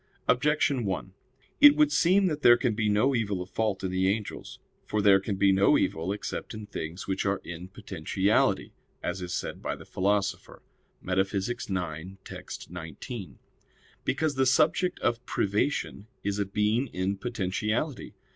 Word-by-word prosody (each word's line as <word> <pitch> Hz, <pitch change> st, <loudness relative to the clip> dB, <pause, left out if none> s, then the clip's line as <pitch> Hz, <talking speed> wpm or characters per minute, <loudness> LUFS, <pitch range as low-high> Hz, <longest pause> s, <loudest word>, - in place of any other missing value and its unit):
Objection 145 Hz, -2 st, +2 dB
1: 95 Hz, -1 st, -3 dB, 0.5 s
It 290 Hz, 0 st, +9 dB
would 300 Hz, -1 st, +4 dB
seem 190 Hz, -, +4 dB
that 155 Hz, -4 st, -1 dB
there 120 Hz, -3 st, +7 dB
can 120 Hz, -2 st, 0 dB
be 105 Hz, 0 st, 0 dB
no 110 Hz, +7 st, +3 dB
evil 105 Hz, -6 st, 0 dB
of 90 Hz, +1 st, -7 dB
fault 105 Hz, -4 st, -1 dB
in 95 Hz, -, -1 dB
the 95 Hz, 0 st, +1 dB
angels. 105 Hz, +1 st, -3 dB, 0.3 s
For 105 Hz, -, -1 dB
there 100 Hz, -1 st, +6 dB
can 100 Hz, +1 st, -3 dB
be 95 Hz, 0 st, +4 dB
no 95 Hz, +1 st, +5 dB
evil 80 Hz, +4 st, -1 dB
except 105 Hz, +2 st, -5 dB
in 110 Hz, -1 st, -7 dB
things 85 Hz, -3 st, -6 dB
which 95 Hz, 0 st, -1 dB
are 100 Hz, 0 st, 0 dB
in 85 Hz, +1 st, -7 dB
potentiality, 95 Hz, 0 st, 0 dB, 0.3 s
as 90 Hz, +2 st, -3 dB
is 90 Hz, -1 st, -5 dB
said -, -, -4 dB
by -, -, -2 dB
the -, -, -13 dB
Philosopher 100 Hz, +1 st, -1 dB, 0.4 s
(Metaph. 95 Hz, +2 st, 0 dB
ix, 95 Hz, -6 st, -4 dB
text. -, -, -8 dB
19), 90 Hz, -, -7 dB, 0.7 s
because 150 Hz, +2 st, 0 dB
the 130 Hz, -1 st, +2 dB
subject 165 Hz, +7 st, +2 dB
of 120 Hz, 0 st, 0 dB
privation 100 Hz, 0 st, -1 dB, 0.2 s
is 100 Hz, 0 st, -1 dB
a 100 Hz, -, +1 dB
being 105 Hz, +6 st, +1 dB
in 95 Hz, -1 st, -2 dB
potentiality. 110 Hz, -, -2 dB
100 Hz, 160 wpm, -28 LUFS, 95-120 Hz, 0.7 s, It